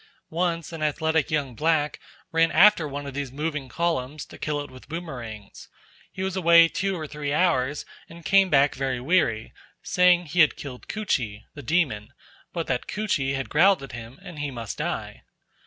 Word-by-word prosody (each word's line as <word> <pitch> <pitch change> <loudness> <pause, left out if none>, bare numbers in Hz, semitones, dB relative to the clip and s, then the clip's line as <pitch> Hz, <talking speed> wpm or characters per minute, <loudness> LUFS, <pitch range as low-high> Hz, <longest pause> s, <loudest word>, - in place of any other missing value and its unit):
Once 170 -1 -1
an 160 - -6
athletic 160 0 +1
young 145 -5 -1
black 150 +3 0 0.3
ran 165 0 +3
after 210 -7 +6
one 145 0 -6
of 140 - -6
these 140 -2 -4
moving 150 -1 -4
columns 150 -1 -2
to - - -14
kill 150 -1 -2
it 145 - -7
with 130 +1 -14
boomerangs. 125 - -8 0.4
He 185 - -5
was 190 -1 -2
away 170 -2 +6
two 195 +2 -1
or 155 - -4
three 150 -1 -4
hours, 145 -4 +1 0.2
and 170 -1 -13
came 195 -1 +5
back 140 -1 +4
very 130 -1 -2
weary, 125 -6 +1 0.3
saying 180 -1 +4
he 165 +3 -3
had 155 - +5
killed 130 -4 -9
Koochee 125 - -2
(the 145 - -9
demon), 130 -6 0 0.4
but 170 -2 -3
that 125 -2 -2
Koochee 155 -11 -1
had 135 -1 -3
growled 180 +1 +4
at 135 - -8
him 120 +1 -9
and 170 -4 -9
he 145 -1 -2
must 115 -5 -6
die. - - -4
150 Hz, 180 wpm, -25 LUFS, 135-170 Hz, 0.4 s, after